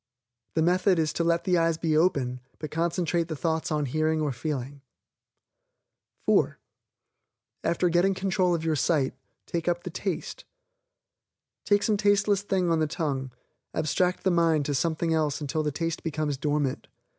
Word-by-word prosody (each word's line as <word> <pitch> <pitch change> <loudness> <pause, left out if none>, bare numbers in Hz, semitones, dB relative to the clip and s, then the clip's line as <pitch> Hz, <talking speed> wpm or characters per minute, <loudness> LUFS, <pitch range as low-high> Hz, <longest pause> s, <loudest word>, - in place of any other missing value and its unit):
The 160 - +3
method 180 +2 +3
is 155 -2 +1
to 170 - 0
let 170 0 +2
the 180 -3 +2
eyes 165 -1 +2
be 160 -2 0
open, 140 -7 +2 0.2
but 155 - -6
concentrate 170 0 0
the 160 - -4
thoughts 160 +2 -1
on 150 -1 +1
hearing 155 +4 0
or 150 -2 0
feeling. 135 +1 -4 1.4
(4) - - +3 1.1
After 175 +1 +1
getting 175 +3 +3
control 190 -2 +1
of 165 -1 -4
your 160 -1 +2
sight, 140 -2 +1 0.3
take 170 0 -3
up 175 0 0
the 180 - -5
TASTE. 185 -1 -4 1.2
Take 205 0 +3
some 215 -2 +2
tasteless 205 -1 +3
thing 190 -4 0
on 165 - +2
the 155 - +2
tongue, 140 -4 -2 0.5
abstract 180 +4 0
the 190 - +3
mind 165 -4 +3
to 145 - -1
something 160 +4 0
else 155 -3 0
until 155 +1 -2
the 150 -1 -1
taste 165 +2 -3
becomes 155 -2 -2
dormant. 145 -1 -1
165 Hz, 160 wpm, -27 LUFS, 150-175 Hz, 1.4 s, The